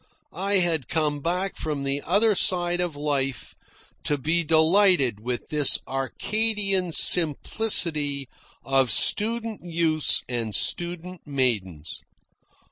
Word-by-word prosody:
I 195 +3 -2
had 165 - +1
come 150 -2 -1
back 180 +5 -3
from 150 -3 -4
the 140 +1 -2
other 210 +7 +2
side 175 -2 +1
of 175 -4 -3
life 140 -3 -3 0.5
to 145 - 0
be 160 +5 -1
delighted 160 - +2
with 120 +2 -6
this 150 -2 +3
Arcadian 195 +7 -2
simplicity 155 - +2 0.4
of 135 -2 +2
student 225 0 +1
youths 165 -3 +1
and 115 -4 -3
student 175 - -1
maidens. 105 - -3
160 Hz, 110 wpm, -24 LUFS, 140-180 Hz, 0.5 s, this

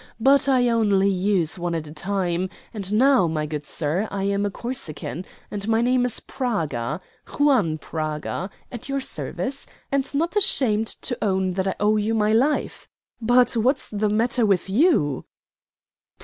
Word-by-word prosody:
But 275 +4 +4
I 250 -2 +4
only 205 -4 +3
use 185 -3 0
one 175 -1 -2
at 160 -1 -3
a 150 - -9
time, 185 +1 -1 0.2
and 200 -3 -3
now, 250 -3 +4
my 155 -1 -1
good 150 -1 -5
sir, 170 +7 -1
I 195 -1 -3
am 200 +1 +1
a - - -2
Corsican, 190 - -5 0.3
and 205 0 -4
my 225 0 +2
name 250 +1 +2
is 250 - -2
Praga 165 - -2 0.4
Juan 250 - +3
Praga, 155 +4 -4 0.2
at 245 +2 -8
your 275 0 0
service, 270 +1 -4 0.2
and 275 -1 0
not 335 +7 0
ashamed 225 - +3 0.2
to 245 - -2
own 190 -2 +1
that 190 +1 -1
I 190 - -1
owe 210 +1 +3
you 215 +2 0
my 215 0 +2
life. 270 +7 0 0.3
But 245 +2 +3
what's 255 +5 +1
the 210 0 0
matter 230 +3 +1
with 195 -3 +1
you?" 210 - +2
210 Hz, 165 wpm, -23 LUFS, 180-245 Hz, 0.4 s, But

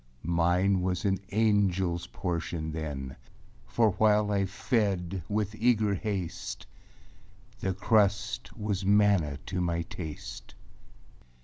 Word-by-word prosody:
Mine 90 +3 +2
was 90 +1 -1
an 95 -2 +2
angelâs 95 -5 +1
portion 85 -3 -3
then, 75 -4 -5 0.5
For 110 - +3
while 105 +1 +3
I 100 -1 +1
fed 100 -4 -1
with 105 0 -1
eager 110 -2 +2
haste, 95 -3 -4 0.9
The 95 -1 -1
crust 105 +1 +1
was 105 -3 -2
manna 100 -7 +3
to 90 -1 -2
my 85 -1 0
taste. 75 -8 -8
95 Hz, 105 wpm, -29 LUFS, 85-105 Hz, 0.9 s, For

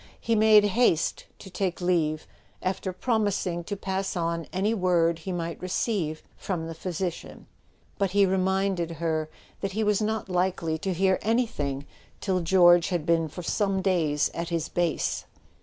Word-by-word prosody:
He 230 - 0
made 215 -1 +6
haste 205 -5 +1
to 190 - -12
take 185 -1 -2
leave, 165 -4 0 0.4
after 185 0 -2
promising 190 -4 -1
to 205 +1 -4
pass 190 0 -2
on 170 -1 -2
any 200 +4 0
word 175 -4 +2
he 175 +4 -5
might 170 -2 -4
receive 180 -3 -1
from 175 -4 -3
the 165 - -5
physician; 175 +1 -5 0.5
but 195 -1 +2
he 200 +2 +4
reminded 190 -2 0
her 160 -1 -2 0.3
that 195 -1 -3
he 220 +2 0
was 210 0 +2
not 215 -1 -1
likely 180 -3 0
to 190 +3 -2
hear 190 +1 +2
any¬ 230 +3 +2
thing 140 -7 -4 0.3
till 190 -2 0
George 175 -1 +5
had 175 -4 -1
been 165 -1 +2
for 175 +4 -8
some 195 +1 0
days 160 -6 +1
at 170 0 -4
his 165 -2 -2
base. 175 -2 -1
180 Hz, 160 wpm, -26 LUFS, 165-195 Hz, 0.5 s, made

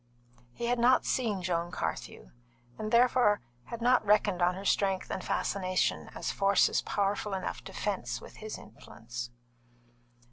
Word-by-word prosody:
He 235 - -4
had 240 0 +1
not 250 +2 +4
seen 215 -7 0
Joan 175 -1 -1
Carthew, - - -5 0.5
and 215 0 -3
therefore 240 -3 +4 0.3
had 235 0 -6
not 250 0 +4
reckoned 205 -3 +3
on 180 +1 +3
her 195 +1 -7
strength 195 -2 +1
and 185 - -3
fascination 185 -2 0
as - - -2
forces 200 0 +3
powerful 200 0 -1
enough 190 - -4
to 195 - -8
fence 200 0 -2
with - - -13
his 215 0 -6
influence. 120 +2 -9
200 Hz, 145 wpm, -30 LUFS, 185-220 Hz, 0.5 s, not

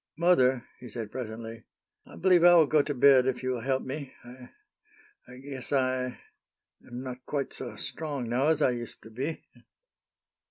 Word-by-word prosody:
"Mother," 130 -8 +3
he 125 - -10
said, 110 -1 -6
presently, 115 -2 -7 0.4
"I - - -13
believe 180 -2 +4
I 175 0 +8
will 165 -2 +7
go 150 +1 +3
to 145 - -3
bed 130 0 +6
if 130 0 -2
you 130 - 0
will 125 - -2
help 130 +1 -1
me. 135 +1 -6
I 125 +1 -13 0.8
I 125 +1 -12
guess 135 -1 -5
I 130 -2 +1 0.8
am 120 +1 -8
not 125 -1 -7
quite 140 -2 -3
so 125 - -6
strong 145 -6 -4
now 125 +5 +1
as 155 -1 +2
I - - +4
used 120 -1 0
to 110 - -13
be." 135 +8 -5
130 Hz, 175 wpm, -28 LUFS, 125-145 Hz, 0.8 s, I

